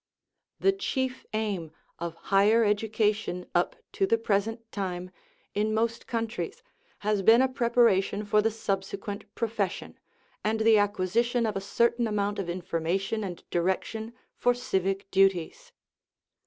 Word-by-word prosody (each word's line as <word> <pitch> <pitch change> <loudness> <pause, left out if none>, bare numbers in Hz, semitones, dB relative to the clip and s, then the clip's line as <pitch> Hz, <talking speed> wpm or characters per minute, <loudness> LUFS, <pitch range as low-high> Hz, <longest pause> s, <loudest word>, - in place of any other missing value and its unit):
The 390 - +4
chief 260 -9 -3
aim 205 -7 -2 0.3
of 170 -1 -4 0.2
higher 215 +4 +5
education 210 -3 0
up - - +1 0.2
to 390 - +1
the 230 - +3
present 225 +1 -1
time, 185 -2 -4 0.4
in 215 +1 0
most 230 +1 -1
countries, 225 -7 -3 0.4
has 210 -1 +2
oeen 230 +6 +6
a - - +4
preparation 235 -5 +2
for 210 +1 +3
the 225 - +2
subsequent 200 -1 -4
profession, 215 -5 -2 0.4
and 220 +1 0
the 220 -1 +6
acquisition 210 +4 +1
of 215 - -1
a 195 - -2
certain 235 +4 +1
amount 205 -1 -1
of 185 -3 -3
information 180 +4 -1
and 180 -3 -6
direction 190 +6 -1 0.2
for 245 0 +2
civic 195 -4 -1
duties. 195 - +2
210 Hz, 130 wpm, -28 LUFS, 195-230 Hz, 0.4 s, oeen